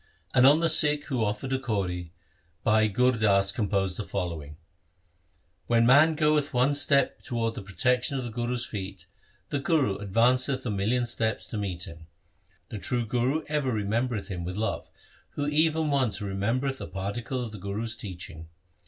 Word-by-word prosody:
And 125 Hz, +2 st, +6 dB
on 150 Hz, +4 st, +5 dB
the 165 Hz, -, +3 dB
Sikh 150 Hz, -2 st, +6 dB
who 125 Hz, -5 st, 0 dB
offered 105 Hz, +5 st, -2 dB
a 135 Hz, -, 0 dB
kauri 90 Hz, -8 st, -3 dB, 0.5 s
Bhai 110 Hz, -1 st, +3 dB
Gur 125 Hz, +5 st, +3 dB
Das 100 Hz, -4 st, +2 dB
composed 100 Hz, -3 st, -1 dB
the -, -, -3 dB
following: 85 Hz, -7 st, -5 dB, 0.5 s
— 85 Hz, +1 st, -42 dB
When 115 Hz, -1 st, +3 dB
man 150 Hz, +6 st, +6 dB
goeth 150 Hz, -3 st, +1 dB
one 125 Hz, +4 st, +3 dB
step 140 Hz, -2 st, +2 dB
towards 115 Hz, -2 st, -2 dB
the -, -, -6 dB
protection 125 Hz, +7 st, 0 dB
of 130 Hz, -, -3 dB
the 120 Hz, -, -5 dB
Guru's 120 Hz, +1 st, -2 dB
feet, 95 Hz, -2 st, -7 dB, 0.4 s
the 145 Hz, -, -1 dB
Guru 140 Hz, -, +1 dB
advanceth 125 Hz, +6 st, +1 dB
a 115 Hz, -, -1 dB
million 110 Hz, +5 st, 0 dB
steps 110 Hz, -2 st, -1 dB
to -, -, -8 dB
meet 90 Hz, -4 st, -4 dB
him. 80 Hz, -1 st, -10 dB, 0.6 s
The 105 Hz, -, -6 dB
true 120 Hz, +3 st, 0 dB
Guru 125 Hz, +7 st, 0 dB
ever 150 Hz, -3 st, -1 dB
remembereth 110 Hz, 0 st, -1 dB
him 90 Hz, -3 st, -4 dB
with 90 Hz, +2 st, -5 dB
love, 110 Hz, +2 st, -3 dB, 0.4 s
who 145 Hz, -, -2 dB
even 155 Hz, +1 st, +1 dB
once 130 Hz, -7 st, +1 dB
remembereth 115 Hz, +7 st, -2 dB
a -, -, -5 dB
particle 105 Hz, +7 st, -4 dB
of 110 Hz, -, -8 dB
the 105 Hz, -, -9 dB
Guru's 105 Hz, +4 st, -4 dB
teaching. 90 Hz, -7 st, -9 dB
115 Hz, 170 wpm, -27 LUFS, 100-130 Hz, 0.6 s, And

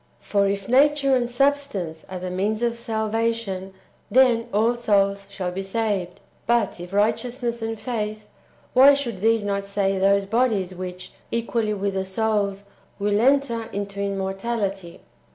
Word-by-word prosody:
For 200 Hz, -1 st, +1 dB
if 195 Hz, 0 st, -2 dB
nature 275 Hz, +1 st, +4 dB
and 240 Hz, -1 st, 0 dB
substance 245 Hz, -, 0 dB
are 185 Hz, -, -5 dB
the 180 Hz, 0 st, -5 dB
means 210 Hz, +5 st, -1 dB
of 235 Hz, -1 st, +1 dB
salvation, 220 Hz, -4 st, -2 dB, 0.4 s
then 240 Hz, -2 st, +4 dB
all 225 Hz, +4 st, +2 dB
souls 200 Hz, -3 st, +1 dB
shall 190 Hz, -3 st, -4 dB
be 190 Hz, +2 st, -4 dB
saved; 195 Hz, -3 st, -2 dB, 0.3 s
but 235 Hz, -6 st, +1 dB
if 175 Hz, +1 st, -8 dB
righteousness 235 Hz, +3 st, 0 dB
and 225 Hz, -1 st, -3 dB
faith, 215 Hz, -3 st, -4 dB, 0.5 s
why 275 Hz, +3 st, +8 dB
should 235 Hz, -9 st, -4 dB
these 225 Hz, 0 st, +3 dB
not 200 Hz, -1 st, -1 dB
save 195 Hz, -1 st, 0 dB
those 200 Hz, 0 st, +3 dB
bodies 210 Hz, -4 st, +1 dB
wdiich, 180 Hz, 0 st, -7 dB, 0.2 s
equally 230 Hz, -2 st, -1 dB
with 200 Hz, 0 st, -2 dB
the 190 Hz, 0 st, -2 dB
souls, 200 Hz, 0 st, -1 dB, 0.3 s
will 205 Hz, 0 st, 0 dB
enter^ 240 Hz, -3 st, +2 dB
into 200 Hz, 0 st, -4 dB
immortality 195 Hz, -1 st, -3 dB
210 Hz, 145 wpm, -23 LUFS, 195-235 Hz, 0.5 s, why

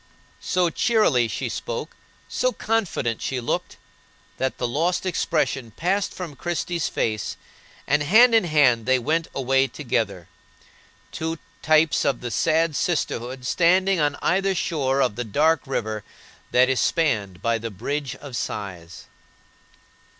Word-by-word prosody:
So 180 Hz, -2 st, +1 dB
cheerily 210 Hz, -, +3 dB
she -, -, -3 dB
spoke, 485 Hz, -1 st, -5 dB, 0.3 s
so -, -, 0 dB
confident 195 Hz, -, -1 dB
she 130 Hz, -, -2 dB
looked, 120 Hz, -, -3 dB, 0.6 s
that 130 Hz, 0 st, -1 dB
the 125 Hz, -, -1 dB
lost 170 Hz, +9 st, 0 dB
expression 155 Hz, -8 st, 0 dB
passed 190 Hz, -, -1 dB
from 170 Hz, -6 st, -7 dB
Christie's 175 Hz, +1 st, -2 dB
face, 110 Hz, -3 st, -2 dB, 0.5 s
and 150 Hz, +1 st, +2 dB
hand 225 Hz, +11 st, +6 dB
in 225 Hz, -5 st, +5 dB
hand 135 Hz, -8 st, +3 dB
they 130 Hz, 0 st, +4 dB
went 155 Hz, +6 st, 0 dB
away 135 Hz, 0 st, +2 dB
together,—two 115 Hz, -, -6 dB, 0.2 s
types 155 Hz, 0 st, +3 dB
of 140 Hz, -3 st, 0 dB
the 120 Hz, -1 st, -4 dB
sad 160 Hz, +6 st, +1 dB
sisterhood 130 Hz, -8 st, -2 dB
standing 185 Hz, +5 st, +3 dB
on 145 Hz, -1 st, +1 dB
either 190 Hz, +2 st, +2 dB
shore 140 Hz, -6 st, 0 dB
of 120 Hz, -4 st, -1 dB
the 120 Hz, -, -1 dB
dark 150 Hz, +7 st, +1 dB
river 110 Hz, -5 st, -3 dB, 0.5 s
that 125 Hz, +1 st, +4 dB
is 130 Hz, -1 st, +1 dB
spanned 105 Hz, -, 0 dB
by 115 Hz, 0 st, +2 dB
a 115 Hz, +1 st, -5 dB
Bridge 130 Hz, +6 st, -4 dB
of 140 Hz, -4 st, -9 dB
Sighs. 95 Hz, -6 st, -5 dB
140 Hz, 135 wpm, -23 LUFS, 120-170 Hz, 0.6 s, hand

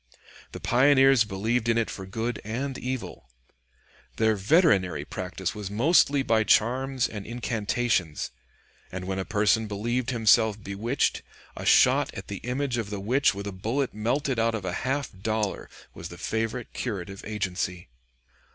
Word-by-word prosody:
The -, -, -6 dB
pioneers 135 Hz, -1 st, +5 dB
believed 110 Hz, +4 st, -1 dB
in 115 Hz, -, +3 dB
it 115 Hz, -, 0 dB
for 95 Hz, -1 st, -7 dB
good 115 Hz, +5 st, -3 dB
and 125 Hz, +6 st, -3 dB
evil. 125 Hz, -, -5 dB, 0.9 s
Their 110 Hz, -1 st, +2 dB
veterinary 100 Hz, -, +3 dB
practice 95 Hz, +2 st, -4 dB
was 105 Hz, -3 st, -6 dB
mostly 140 Hz, -, +3 dB
by 115 Hz, -3 st, +2 dB
charms 130 Hz, +4 st, +2 dB
and 105 Hz, -2 st, -7 dB
incantations; 115 Hz, -7 st, -1 dB, 0.6 s
and 90 Hz, 0 st, -5 dB
when 95 Hz, 0 st, -2 dB
a 95 Hz, -, -3 dB
person 110 Hz, +1 st, +2 dB
believed 120 Hz, +5 st, -2 dB
himself 110 Hz, -3 st, +3 dB
bewitched, 110 Hz, +8 st, -1 dB, 0.3 s
a -, -, -5 dB
shot -, -, +5 dB
at -, -, -8 dB
the 100 Hz, -, -4 dB
image 125 Hz, +2 st, -2 dB
of 110 Hz, -3 st, -4 dB
the 105 Hz, -1 st, -4 dB
witch 120 Hz, +3 st, +2 dB
with 100 Hz, 0 st, -6 dB
a 100 Hz, -, -4 dB
bullet 115 Hz, +8 st, -2 dB
melted 125 Hz, +4 st, -1 dB
out 115 Hz, 0 st, +2 dB
of 105 Hz, -4 st, -5 dB
a 90 Hz, -, -2 dB
half 135 Hz, +2 st, -1 dB
dollar 110 Hz, +1 st, -2 dB, 0.2 s
was 85 Hz, -, -8 dB
the 85 Hz, -, -10 dB
favorite 115 Hz, +4 st, -3 dB
curative 100 Hz, -4 st, -5 dB
agency. 90 Hz, -5 st, -3 dB
110 Hz, 150 wpm, -26 LUFS, 100-125 Hz, 0.9 s, pioneers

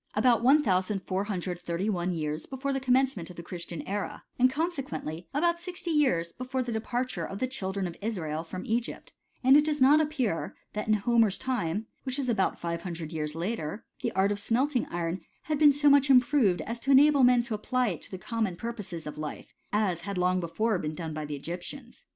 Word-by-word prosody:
about 230 Hz, +1 st, +4 dB
1431 190 Hz, -, +1 dB
years 155 Hz, -2 st, -3 dB
before 275 Hz, +1 st, -3 dB
the 270 Hz, -, 0 dB
commencement 255 Hz, -8 st, +1 dB
of 180 Hz, -, -10 dB
the 170 Hz, -, -8 dB
Christian 170 Hz, -2 st, -6 dB
era, 200 Hz, +1 st, -3 dB, 0.2 s
and 255 Hz, +1 st, +6 dB
consequently 260 Hz, -, -3 dB
about 340 Hz, +4 st, +1 dB
sixty 355 Hz, -1 st, -4 dB
years 215 Hz, -, +2 dB
before 255 Hz, +1 st, -3 dB
the 240 Hz, -, -4 dB
departure 240 Hz, +3 st, -2 dB
of 195 Hz, -, -5 dB
the 255 Hz, -, 0 dB
children 195 Hz, -6 st, -3 dB
of 170 Hz, -2 st, -5 dB
Israel 165 Hz, -8 st, -2 dB
from 185 Hz, +2 st, -7 dB
Egypt: 235 Hz, +1 st, -3 dB, 0.3 s
and 260 Hz, +2 st, +7 dB
it 295 Hz, -, +7 dB
does 300 Hz, -1 st, -1 dB
not 285 Hz, +4 st, +6 dB
appear, 265 Hz, -, -1 dB, 0.2 s
that 210 Hz, +1 st, -3 dB
in 215 Hz, -, +4 dB
Homer's 220 Hz, -1 st, +3 dB
time, 220 Hz, -6 st, -2 dB, 0.2 s
which 260 Hz, 0 st, -4 dB
was 270 Hz, -3 st, -1 dB
about 210 Hz, -5 st, +1 dB
five 170 Hz, 0 st, -3 dB
hundred 170 Hz, -2 st, -6 dB
years 150 Hz, -1 st, -3 dB
later, 175 Hz, +1 st, -3 dB, 0.2 s
the -, -, -1 dB
art 195 Hz, +1 st, +2 dB
of 205 Hz, -, -1 dB
smelting 250 Hz, +4 st, +1 dB
iron 170 Hz, +1 st, -3 dB, 0.2 s
had 305 Hz, -2 st, -1 dB
been 300 Hz, -1 st, +8 dB
so 290 Hz, +1 st, +2 dB
much 280 Hz, -1 st, +6 dB
improved, 250 Hz, -7 st, +4 dB
as 230 Hz, +1 st, -4 dB
to 270 Hz, -, -5 dB
enable 280 Hz, 0 st, +6 dB
men 245 Hz, -1 st, +5 dB
to 235 Hz, -1 st, -4 dB
apply 250 Hz, +3 st, 0 dB
it 170 Hz, -6 st, -5 dB
to -, -, -11 dB
the 190 Hz, -, -6 dB
common 220 Hz, -2 st, -2 dB
purposes 205 Hz, -6 st, -6 dB
of 150 Hz, 0 st, -7 dB
life, 150 Hz, -1 st, -6 dB, 0.2 s
as 200 Hz, -5 st, +1 dB
had 200 Hz, +1 st, -4 dB
long 180 Hz, +1 st, +2 dB
before 190 Hz, +4 st, 0 dB
been 155 Hz, -1 st, -3 dB
done 160 Hz, -2 st, -5 dB
by 155 Hz, 0 st, -4 dB
the 145 Hz, 0 st, -4 dB
Egyptians. 175 Hz, -, -8 dB
210 Hz, 200 wpm, -28 LUFS, 175-260 Hz, 0.3 s, been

